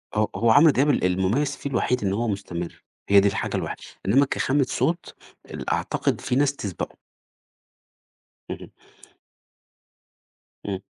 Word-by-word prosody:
هو 105 Hz, 0 st, +2 dB
هو 115 Hz, 0 st, +3 dB
عمرو 150 Hz, +6 st, +7 dB
دياب 135 Hz, +3 st, +2 dB
ال 145 Hz, -, +2 dB
المميّز 95 Hz, +10 st, +1 dB
فيه 140 Hz, -, -5 dB
الوحيد 125 Hz, -3 st, 0 dB
إن 95 Hz, -, +1 dB
هو 115 Hz, +3 st, -1 dB
مستمرّ، 90 Hz, -4 st, -5 dB, 0.3 s
هي 100 Hz, -, +8 dB
دي 100 Hz, -, +4 dB
الحاجة 100 Hz, -, -2 dB
الوحي -, -, -3 dB, 0.3 s
إنّما 135 Hz, +9 st, +4 dB
كخامة 135 Hz, 0 st, +1 dB
صوت 170 Hz, +1 st, -1 dB, 0.4 s
ال -, -, -5 dB
أعتقد -, -, -1 dB
في 125 Hz, -, -1 dB
ناس 140 Hz, +1 st, +2 dB
تسبقُه. 100 Hz, -9 st, -5 dB, 1.5 s
اهم. -, -, -7 dB, 1.9 s
إمم، 95 Hz, -2 st, -3 dB
115 Hz, 135 wpm, -24 LUFS, 100-140 Hz, 1.9 s, هي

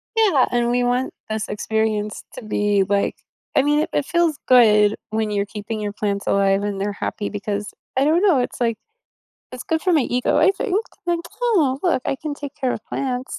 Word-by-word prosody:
Yeah, 390 Hz, -, +4 dB
and 240 Hz, -1 st, +1 dB
we 245 Hz, 0 st, +1 dB
want 245 Hz, +1 st, 0 dB, 0.2 s
this 215 Hz, -1 st, -2 dB
experience 215 Hz, 0 st, -1 dB
to 255 Hz, -, -9 dB
be, 205 Hz, -1 st, +1 dB
like 200 Hz, 0 st, +1 dB, 0.4 s
I -, -, +7 dB
mean, 295 Hz, +2 st, +2 dB
it 310 Hz, -, 0 dB
it 290 Hz, -, 0 dB
feels 340 Hz, -3 st, +1 dB
good 215 Hz, -4 st, +6 dB, 0.2 s
when 220 Hz, -1 st, -1 dB
you're 200 Hz, 0 st, 0 dB
keeping 215 Hz, +1 st, -6 dB
your 205 Hz, -1 st, -3 dB
plants 200 Hz, -2 st, -2 dB
alive 195 Hz, 0 st, +3 dB
and 205 Hz, -1 st, -3 dB
they're 205 Hz, +1 st, -1 dB
happy 205 Hz, 0 st, -4 dB
because 205 Hz, 0 st, -4 dB, 0.2 s
I 265 Hz, -, +4 dB
don't 320 Hz, +4 st, +3 dB
know, 370 Hz, -9 st, +4 dB
it's, 245 Hz, -, -3 dB
like, 230 Hz, -2 st, 0 dB, 0.8 s
it's 255 Hz, -1 st, -6 dB
good 320 Hz, 0 st, -1 dB
for 365 Hz, +1 st, +1 dB
my 315 Hz, -, +4 dB
ego, 250 Hz, -1 st, 0 dB
I -, -, +5 dB
think. 390 Hz, 0 st, -3 dB, 0.3 s
Like, 345 Hz, -1 st, +1 dB, 0.2 s
"Oh, 325 Hz, -, +2 dB
look, 330 Hz, -8 st, +2 dB
I -, -, -1 dB
can 300 Hz, -2 st, -4 dB
take 285 Hz, 0 st, -8 dB
care 260 Hz, -4 st, 0 dB
of 215 Hz, -, -6 dB
plants." 255 Hz, -1 st, -3 dB
245 Hz, 205 wpm, -21 LUFS, 210-290 Hz, 0.8 s, I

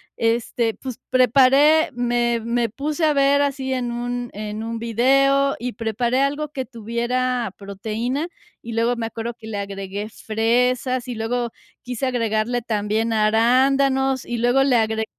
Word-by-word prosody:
este, 230 Hz, 0 st, 0 dB
pues, 255 Hz, -3 st, -7 dB
preparé 270 Hz, +5 st, +5 dB
me 240 Hz, -1 st, 0 dB
me 235 Hz, +1 st, 0 dB
puse 290 Hz, +7 st, -3 dB
a 310 Hz, -, +5 dB
ver 280 Hz, 0 st, +3 dB
así 270 Hz, -2 st, -1 dB
en 245 Hz, -2 st, -2 dB
un 245 Hz, 0 st, -3 dB
en 210 Hz, +1 st, -5 dB
un 230 Hz, 0 st, -4 dB
video 275 Hz, +4 st, +3 dB
y 245 Hz, 0 st, -4 dB
preparé 235 Hz, +3 st, 0 dB
algo 290 Hz, +2 st, 0 dB
que 265 Hz, -, -2 dB
tuviera 240 Hz, 0 st, -2 dB
proteína. 220 Hz, -, -3 dB, 0.3 s
Y 230 Hz, -, -8 dB
luego 230 Hz, +2 st, +1 dB
me 230 Hz, -1 st, -3 dB
acuerdo 230 Hz, +1 st, -5 dB
que 220 Hz, -, -11 dB
le 215 Hz, -2 st, -4 dB
agregué 200 Hz, +1 st, -5 dB
fresas, 245 Hz, +4 st, 0 dB
y 245 Hz, -, -4 dB
luego 235 Hz, +1 st, -2 dB, 0.3 s
quise 250 Hz, +1 st, -4 dB
agregarle 235 Hz, -1 st, 0 dB
también 220 Hz, 0 st, -1 dB
arándanos, 260 Hz, +5 st, +3 dB
y 240 Hz, -, -3 dB
luego 245 Hz, +3 st, +3 dB
le 265 Hz, -3 st, +3 dB
agregué 220 Hz, 0 st, 0 dB
240 Hz, 150 wpm, -22 LUFS, 225-260 Hz, 0.3 s, preparé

